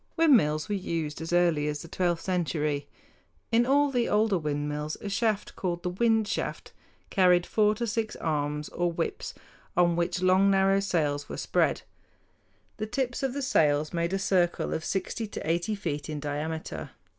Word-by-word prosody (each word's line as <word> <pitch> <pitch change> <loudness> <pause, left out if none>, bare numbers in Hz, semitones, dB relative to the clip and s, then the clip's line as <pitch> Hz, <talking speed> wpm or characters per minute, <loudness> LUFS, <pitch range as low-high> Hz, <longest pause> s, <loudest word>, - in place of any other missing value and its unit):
Windmills 220 - +4
were 210 - -2
used 165 -6 -3
as 165 - -5
early 170 -4 +3
as 150 +1 -3
the - - -10
twelfth 175 -1 -1
century. 155 -5 -1 0.6
In 235 +1 +3
all 285 +1 +3
the 245 -3 +1
older 210 -3 +2
windmills 150 0 -3
a 205 - -5
shaft 210 0 -1
called 175 -2 -3
the 180 - -1
wind 225 +2 +2
shaft - - -3 0.4
carried 180 -2 +4
four 210 -1 +2
to 235 - -2
six 225 -1 -2
arms 150 -1 -2
or 175 0 -1
whips, 165 - -3 0.4
on 175 -1 +4
which 175 +1 0
long, 185 +2 +5
narrow 195 0 +4
sails 150 -7 -1
were - - -5
spread. - - +1 0.9
The 215 - -3
tips 245 +1 -2
of 270 -2 -1
the 285 - -2
sails 150 - +2
made 170 0 0
a 195 - +1
circle 180 -2 +1
of 160 - -3
sixty 200 +5 -2
to 205 - -6
eighty 175 +6 0
feet 155 -7 -4
in 150 -1 -3
diameter. 150 +2 -4
175 Hz, 170 wpm, -28 LUFS, 155-210 Hz, 0.9 s, long